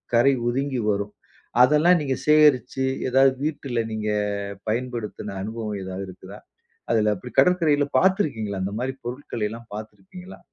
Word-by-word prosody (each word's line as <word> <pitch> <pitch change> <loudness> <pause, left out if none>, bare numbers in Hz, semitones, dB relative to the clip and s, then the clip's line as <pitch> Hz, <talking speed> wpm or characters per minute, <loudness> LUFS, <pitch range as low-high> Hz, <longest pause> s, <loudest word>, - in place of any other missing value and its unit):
கரை 130 +4 +5
ஒதுங்கி 130 +1 -1
வரும். 100 +1 -3 0.5
அதெல்லாம் 150 +7 +5
நீங்க 135 -3 -1
சேகரிச்சு, 140 -4 +4 0.2
ஏதாது 135 +1 +5
வீட்டில 140 -5 -2
நீங்க 110 -1 -2 0.6
பயன்படுத்தின 115 -3 -4
அனுபவம் 110 -1 -4
ஏதாது 95 +1 -5
இருக்குதா? 95 +2 -11 0.5
அதில 105 -1 +3
அப்படி 125 +6 -10
கடற்கரையில 160 -5 +4
பாத்துருக்கீங்களா? 140 - +1
அந்த 95 +2 -3
மாரி 130 +1 -2
பொருள்களை 120 -2 -4
எல்லாம் 115 +1 -10
பாத்துருப்பீங்களா? 110 - -10
120 Hz, 125 wpm, -24 LUFS, 105-145 Hz, 0.6 s, கரை